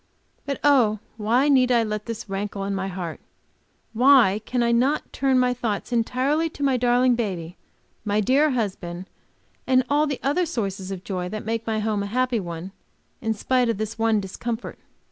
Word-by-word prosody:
But, 275 Hz, -, -2 dB
oh, 250 Hz, -7 st, +4 dB, 0.2 s
why 235 Hz, +6 st, +2 dB
need 260 Hz, -3 st, +4 dB
I 235 Hz, -2 st, +4 dB
let 215 Hz, 0 st, -4 dB
this 230 Hz, -2 st, -5 dB
rankle 195 Hz, 0 st, -4 dB
in 200 Hz, 0 st, -2 dB
my 190 Hz, 0 st, -2 dB
heart! 180 Hz, -3 st, -5 dB, 0.7 s
Why 235 Hz, -4 st, +5 dB
cannot 245 Hz, +4 st, +2 dB
I -, -, -31 dB
turn 270 Hz, -1 st, +1 dB
my 250 Hz, 0 st, +3 dB
thoughts 230 Hz, -2 st, -3 dB
entirely 260 Hz, +7 st, +1 dB
to 290 Hz, -, -7 dB
my 270 Hz, -2 st, +3 dB
darling 245 Hz, +1 st, +3 dB
baby, 185 Hz, -7 st, -3 dB, 0.5 s
my 210 Hz, 0 st, 0 dB
dear 270 Hz, +8 st, +3 dB
husband, 190 Hz, -8 st, -3 dB, 0.6 s
and 255 Hz, 0 st, +4 dB
all 300 Hz, +1 st, +3 dB
the 280 Hz, -3 st, -3 dB
other 295 Hz, +7 st, +1 dB
sources 195 Hz, -7 st, -3 dB
of 190 Hz, -2 st, -6 dB
joy 180 Hz, -3 st, -3 dB
that 215 Hz, +1 st, -6 dB
make 225 Hz, +1 st, -3 dB
my 220 Hz, -1 st, 0 dB
home 210 Hz, -1 st, 0 dB
a 200 Hz, -, -3 dB
happy 250 Hz, +2 st, 0 dB
one 170 Hz, 0 st, -6 dB, 0.5 s
in 220 Hz, 0 st, -1 dB
spite 250 Hz, +2 st, +1 dB
of 230 Hz, -, 0 dB
this 215 Hz, +1 st, -4 dB
one 225 Hz, -1 st, +3 dB
discomfort! 225 Hz, +4 st, -5 dB
230 Hz, 180 wpm, -24 LUFS, 200-255 Hz, 0.7 s, Why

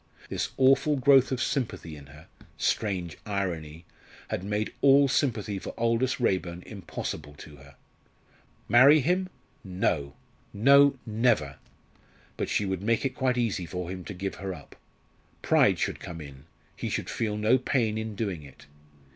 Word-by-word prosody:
This -, -, -2 dB
awful 135 Hz, +3 st, +4 dB
growth 135 Hz, -1 st, +5 dB
of 130 Hz, -, -1 dB
sympathy 105 Hz, -, -2 dB
in 70 Hz, -1 st, -13 dB
her 75 Hz, +3 st, -15 dB, 0.3 s
strange 90 Hz, -6 st, -1 dB
irony! 85 Hz, -6 st, -4 dB, 0.4 s
had -, -, -3 dB
made 105 Hz, +2 st, -2 dB
all 140 Hz, 0 st, +6 dB
sympathy 110 Hz, -8 st, -1 dB
for -, -, -8 dB
Aldous 115 Hz, +3 st, +1 dB
Raeburn 90 Hz, -6 st, -1 dB
impossible 80 Hz, -6 st, -6 dB
to 75 Hz, -1 st, -12 dB
her. 70 Hz, 0 st, -17 dB, 0.9 s
Marry 135 Hz, +6 st, +7 dB
him? 180 Hz, +6 st, 0 dB, 0.3 s
no! 90 Hz, -7 st, -1 dB, 0.4 s
no! 140 Hz, +6 st, +5 dB
never! 110 Hz, -, +1 dB, 0.8 s
But -, -, -3 dB
she 105 Hz, -, 0 dB
would 95 Hz, -1 st, -2 dB
make 115 Hz, +5 st, 0 dB
it 135 Hz, -, -1 dB
quite 125 Hz, -1 st, 0 dB
easy 105 Hz, -7 st, -1 dB
to 90 Hz, 0 st, -5 dB
him 90 Hz, -1 st, -6 dB
to 105 Hz, -, -6 dB
give 95 Hz, +2 st, -4 dB
her 95 Hz, -2 st, -4 dB
up. 70 Hz, -, -14 dB, 0.7 s
Pride -, -, +4 dB
should -, -, -2 dB
come 85 Hz, -1 st, -8 dB
in 70 Hz, -2 st, -11 dB, 0.3 s
he -, -, -4 dB
should -, -, -3 dB
feel 105 Hz, -2 st, -2 dB
no 110 Hz, +5 st, +3 dB
pain 115 Hz, -4 st, 0 dB
in 110 Hz, -1 st, -4 dB
doing 100 Hz, -6 st, -3 dB
it. 70 Hz, -2 st, -15 dB
105 Hz, 155 wpm, -27 LUFS, 85-125 Hz, 0.9 s, Marry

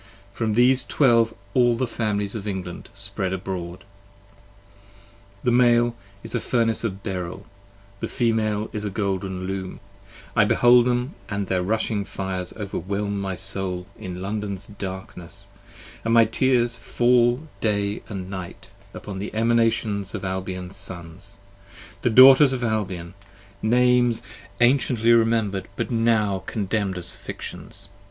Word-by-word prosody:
From 110 Hz, 0 st, -1 dB
these 125 Hz, +2 st, +4 dB
Twelve 115 Hz, -5 st, +3 dB, 0.2 s
all 120 Hz, -2 st, +4 dB
the 130 Hz, -, +1 dB
Families 105 Hz, -4 st, -2 dB
of 105 Hz, -2 st, -5 dB
England 95 Hz, -3 st, -5 dB
spread 100 Hz, -1 st, -2 dB
abroad. 90 Hz, -2 st, -5 dB, 1.6 s
The 125 Hz, -, +2 dB
Male 120 Hz, -1 st, +4 dB, 0.3 s
is 115 Hz, -, -7 dB
a 120 Hz, -, +1 dB
Furnace 115 Hz, -1 st, 0 dB
of 100 Hz, -3 st, -3 dB
beryll; 95 Hz, -1 st, -5 dB, 0.5 s
the -, -, -3 dB
Female 110 Hz, -3 st, 0 dB
is 105 Hz, -2 st, -4 dB
a 105 Hz, -, -2 dB
golden 95 Hz, -2 st, -2 dB
Loom; 95 Hz, -1 st, -4 dB, 0.5 s
35 -, -, -13 dB
I -, -, +6 dB
behold 120 Hz, 0 st, +5 dB
them 125 Hz, +3 st, 0 dB, 0.2 s
and 100 Hz, -1 st, -2 dB
their 95 Hz, -1 st, 0 dB
rushing 105 Hz, +1 st, 0 dB
fires 95 Hz, -2 st, -4 dB
overwhelm 100 Hz, 0 st, -3 dB
my 95 Hz, -1 st, -3 dB
Soul, 95 Hz, -1 st, -1 dB
In 90 Hz, -3 st, -7 dB
London's 100 Hz, -1 st, -3 dB
darkness; 95 Hz, -4 st, -7 dB, 0.6 s
and 115 Hz, 0 st, +2 dB
my 115 Hz, -1 st, +7 dB
tears 120 Hz, 0 st, +1 dB
fall 120 Hz, +4 st, +2 dB
day 100 Hz, -1 st, 0 dB
and 95 Hz, -4 st, -5 dB
night, 95 Hz, -2 st, -8 dB, 0.3 s
Upon 100 Hz, -2 st, -7 dB
the 100 Hz, -, -4 dB
Emanations 115 Hz, -3 st, +1 dB
of -, -, -5 dB
Albion's 95 Hz, 0 st, -4 dB
Sons; 95 Hz, +1 st, -4 dB, 0.6 s
the -, -, +2 dB
Daughters 130 Hz, +3 st, +8 dB
of 125 Hz, -1 st, -3 dB
Albion, 95 Hz, -6 st, -2 dB, 0.5 s
Names 125 Hz, +1 st, +3 dB, 0.4 s
anciently 120 Hz, -2 st, +4 dB
remember'd, 115 Hz, -4 st, +2 dB
but 115 Hz, +1 st, -3 dB
now 110 Hz, -4 st, +2 dB
contemn'd 100 Hz, -2 st, -1 dB
as 90 Hz, -1 st, -1 dB
fictions 100 Hz, -, -8 dB
105 Hz, 130 wpm, -24 LUFS, 95-115 Hz, 1.6 s, Daughters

